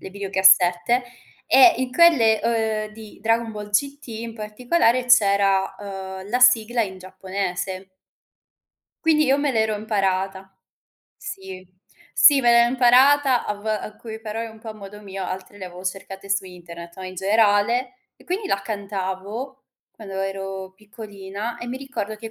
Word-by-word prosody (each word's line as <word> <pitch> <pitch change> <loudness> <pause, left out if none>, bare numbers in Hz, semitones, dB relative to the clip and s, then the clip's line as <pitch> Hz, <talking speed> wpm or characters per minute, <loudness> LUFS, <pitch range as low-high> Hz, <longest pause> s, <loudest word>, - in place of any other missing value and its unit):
le 190 - -9
videocassette, 190 +3 +3 0.4
e 270 +6 +7
in 255 -1 -3
quelle, 255 -10 +5 0.5
uhm, - - -17
di 215 -2 -13
Dragon 225 0 0
Ball 210 0 -8
GT 280 +7 -1
in 225 0 -7
particolare 240 +4 0
c'era, 200 -4 +3
uhm, 190 -1 -8
la 250 +1 0
sigla 240 -1 +4
in 190 -3 -6
giapponese. 190 0 -5 1.2
Quindi 310 -1 +4
io 270 - +3
me 285 -1 0
l'ero 220 -2 +1
imparata. 195 -2 -2 0.6
Sì, 190 -1 -9 0.5
sì, 280 -2 +6
me 240 - +3
l'ero 235 0 +5
imparata 260 +1 +4
a - - -2
v 205 +1 -13
alcuni 220 +1 -5
parole 225 +1 -5
un 220 0 -14
po' 225 - -8
a - - -9
modo 210 0 -11
mio, 195 -1 -7
altre 190 +2 -7
le 185 - -7
avevo 180 +1 -11
cercate 195 +1 -6
su 200 -1 0
internet, 170 -1 -11
no, 190 - -9
in 185 0 -8
generale. 215 +5 +1 0.2
E - - -21
quindi 385 +3 -3
la 195 0 -1
cantavo 205 +5 -5 0.3
quando 200 -3 -11
ero 195 -1 -5
piccolina 205 +1 -8
e 240 - -7
mi 245 - -4
ricordo 260 -6 -5
che 225 +1 -9
210 Hz, 155 wpm, -22 LUFS, 195-240 Hz, 1.2 s, e